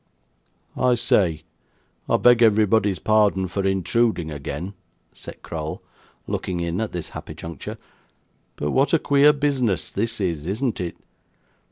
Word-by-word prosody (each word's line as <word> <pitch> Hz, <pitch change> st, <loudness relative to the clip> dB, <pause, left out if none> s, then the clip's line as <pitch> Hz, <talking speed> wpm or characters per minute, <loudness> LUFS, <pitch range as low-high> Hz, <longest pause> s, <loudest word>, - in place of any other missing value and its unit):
'I 125 Hz, -1 st, +3 dB
say! 95 Hz, -10 st, +1 dB, 0.7 s
I -, -, +4 dB
beg 120 Hz, -1 st, +5 dB
everybody's 105 Hz, -3 st, +4 dB
pardon 105 Hz, -1 st, +2 dB
for 95 Hz, +2 st, -3 dB
intruding 95 Hz, -2 st, +1 dB
again,' 75 Hz, +6 st, -5 dB, 0.4 s
said -, -, -11 dB
Crowl, 80 Hz, -1 st, -5 dB, 0.4 s
looking 90 Hz, -2 st, -3 dB
in 85 Hz, +3 st, -2 dB
at 110 Hz, -, -2 dB
this 85 Hz, -2 st, -5 dB
happy -, -, -8 dB
juncture; 80 Hz, -4 st, -7 dB, 0.8 s
'but 75 Hz, -, -2 dB
what 135 Hz, +4 st, +2 dB
a -, -, +7 dB
queer 145 Hz, 0 st, +5 dB
business 135 Hz, -, 0 dB
this 115 Hz, +3 st, -2 dB
is, 85 Hz, -5 st, -2 dB
isn't 110 Hz, +3 st, -1 dB
it? 85 Hz, -1 st, -5 dB
100 Hz, 135 wpm, -23 LUFS, 85-115 Hz, 0.8 s, a